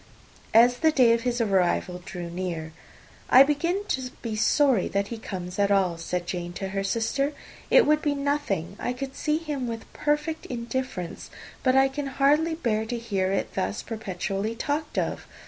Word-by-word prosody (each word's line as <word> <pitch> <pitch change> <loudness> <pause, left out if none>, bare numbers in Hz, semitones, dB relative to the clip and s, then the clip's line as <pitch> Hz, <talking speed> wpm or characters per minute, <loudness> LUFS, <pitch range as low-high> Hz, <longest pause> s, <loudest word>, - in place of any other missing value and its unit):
As 245 +2 +7
the 320 - +4
day 255 -6 +5
of 230 - +1
his 245 0 -1
arrival 185 -4 +1
drew 175 -1 -6
near, 170 -3 -4 0.6
"I 260 - +9
begin 335 +7 0
to 260 -1 -1
be 225 -2 -3
sorry 255 0 +3
that 200 0 -1
he 230 - -5
comes 180 -3 -6
at 200 0 +3
all," 185 -4 +2
said 175 +1 -3
Jane 175 -1 -4
to 190 +2 -4
her 195 0 -2
sister. 235 +8 0 0.4
"It - - +6
would 305 +1 +3
be 290 -1 0
nothing; 280 - -1
I 245 - -2
could 270 +1 -6
see 300 0 0
him 295 -6 -3
with 230 -1 -5
perfect 300 +2 -1
indifference; 235 -7 -4 0.3
but 255 0 +3
I 270 0 +6
can 275 +1 -4
hardly 295 +4 +2
bear 220 -8 0
to 240 - -2
hear 195 -5 -1
it 195 - -1
thus 195 +2 -2
perpetually 205 0 -3
talked 295 +5 -3
of. - - -2
235 Hz, 180 wpm, -26 LUFS, 195-280 Hz, 0.6 s, I